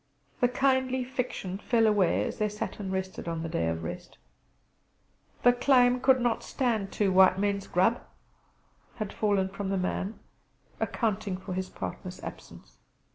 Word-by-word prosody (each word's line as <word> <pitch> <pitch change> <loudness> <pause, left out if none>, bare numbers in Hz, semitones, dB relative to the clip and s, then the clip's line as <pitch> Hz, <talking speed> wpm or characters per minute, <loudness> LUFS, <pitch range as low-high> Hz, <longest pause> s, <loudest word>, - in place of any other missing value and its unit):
The 245 - +4
kindly 260 0 +1
fiction 245 -7 -4
fell 230 0 +2
away 205 -5 +3
as - - -4
they 210 0 +1
sat 210 +1 -5
and 195 -2 -4
rested 190 -2 -4
on 165 -1 -3
the - - -3
day 85 - 0
of 80 0 -2
rest. - - -7 1.3
"The 245 - +7
claim 250 -1 +4
could 260 0 +4
not 240 -2 +1
stand 225 -7 -1
two 200 -2 +1
white 185 0 +6
men's 200 0 -1
grub" 190 +7 +2 0.9
had 215 -4 -4
fallen 200 -3 +1
from 200 0 -4
the 195 - 0
man, 190 +3 -2 0.6
accounting 205 -4 -1
for 185 0 -6
his 185 0 -3
partner's 90 -2 -6
absence. - - -10
205 Hz, 155 wpm, -28 LUFS, 190-245 Hz, 1.3 s, The